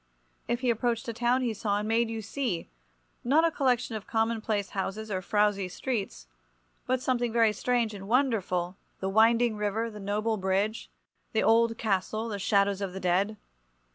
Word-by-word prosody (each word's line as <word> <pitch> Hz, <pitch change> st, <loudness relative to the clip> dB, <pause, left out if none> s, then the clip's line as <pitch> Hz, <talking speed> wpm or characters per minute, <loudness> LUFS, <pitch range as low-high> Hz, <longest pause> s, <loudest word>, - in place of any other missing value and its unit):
If 240 Hz, +1 st, -1 dB
he 250 Hz, -2 st, +3 dB
approached 235 Hz, 0 st, -1 dB
a 230 Hz, -, -3 dB
town 240 Hz, +3 st, +1 dB
he 235 Hz, -3 st, 0 dB
saw 205 Hz, -1 st, -1 dB
and 210 Hz, +1 st, -2 dB
made 225 Hz, +1 st, +2 dB
you 225 Hz, -1 st, -4 dB
see—not 175 Hz, -, -2 dB
a 330 Hz, -, +2 dB
collection 250 Hz, -5 st, 0 dB
of 215 Hz, -, -6 dB
commonplace 220 Hz, -2 st, 0 dB
houses 205 Hz, +2 st, -4 dB
or 185 Hz, -1 st, -1 dB
frowsy 205 Hz, -1 st, +1 dB
streets, 200 Hz, -, -4 dB, 0.6 s
but 255 Hz, 0 st, 0 dB
something 245 Hz, -2 st, 0 dB
very 225 Hz, -2 st, +3 dB
strange 240 Hz, -1 st, 0 dB
and 195 Hz, -1 st, -8 dB
wonderful, 200 Hz, -8 st, +1 dB, 0.2 s
the 190 Hz, -, -2 dB
winding 225 Hz, +2 st, +4 dB
river, 215 Hz, +2 st, -1 dB
the 210 Hz, -, -9 dB
noble 210 Hz, +2 st, -1 dB
bridge, 195 Hz, +3 st, -1 dB, 0.4 s
the 220 Hz, -, +2 dB
old 230 Hz, 0 st, +4 dB
castle, 215 Hz, +2 st, -1 dB
the 205 Hz, -2 st, -4 dB
shadows 200 Hz, 0 st, +2 dB
of 195 Hz, -2 st, -3 dB
the 190 Hz, -, -5 dB
dead. 190 Hz, +4 st, +1 dB
220 Hz, 170 wpm, -28 LUFS, 200-235 Hz, 0.6 s, winding